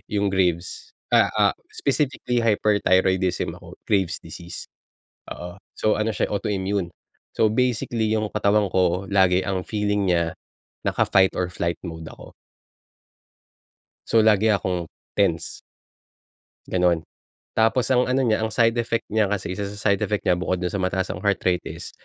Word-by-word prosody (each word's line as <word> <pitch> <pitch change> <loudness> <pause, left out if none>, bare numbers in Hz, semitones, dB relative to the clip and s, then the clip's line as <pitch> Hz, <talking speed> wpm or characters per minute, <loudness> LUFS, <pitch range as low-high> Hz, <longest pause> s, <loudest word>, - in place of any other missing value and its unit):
yung 100 -1 0
graves. 90 -2 -1 0.2
Ah, - - +5
ah - - +4 0.2
specifically 135 -3 -1
hyperthyroidism 95 -4 +2
ako - - -12
graves 95 -5 +1
disease. 85 +1 -8 0.7
Oo, 90 +1 -9 0.2
so 110 - +1
ano 110 +1 0
siya - - -1
autoimmune. 100 -3 -2 0.4
So 110 - +3
basically 115 -1 0
yung 110 -1 0
katawan 105 -1 +2
ko 90 +1 +1
lagi 95 -2 +4
ang 95 -1 -2
feeling 105 -1 0
niya, 85 -1 0 0.5
naka-fight 95 -1 +3
or 90 -1 -1
flight 85 -1 -3
mode 80 -2 -7
ako. - - -13 1.8
So, 115 -1 +4
lagi 110 0 +4
akong 90 -5 0 0.3
tense. 85 -6 0 1.1
Ganon. 90 -2 +2 0.6
Tapos 115 +3 +2
ang 125 -1 +3
ano 130 +1 +1
niya, 110 -3 +2
ang 110 -1 -2
side 115 0 +3
effect 115 0 -1
niya 110 -1 +2
kasi 95 -2 -3
isa 100 +2 -3
sa 100 +1 -1
side 100 - +1
effect 105 -1 -1
nya 90 -1 +2
bukod 90 0 -2
dun 90 - -1
sa 100 - -2
mataas 95 0 -1
ang - - -6
heart 100 -1 0
rate 90 -1 +1
is, - - -8
100 Hz, 150 wpm, -23 LUFS, 90-110 Hz, 1.8 s, Ah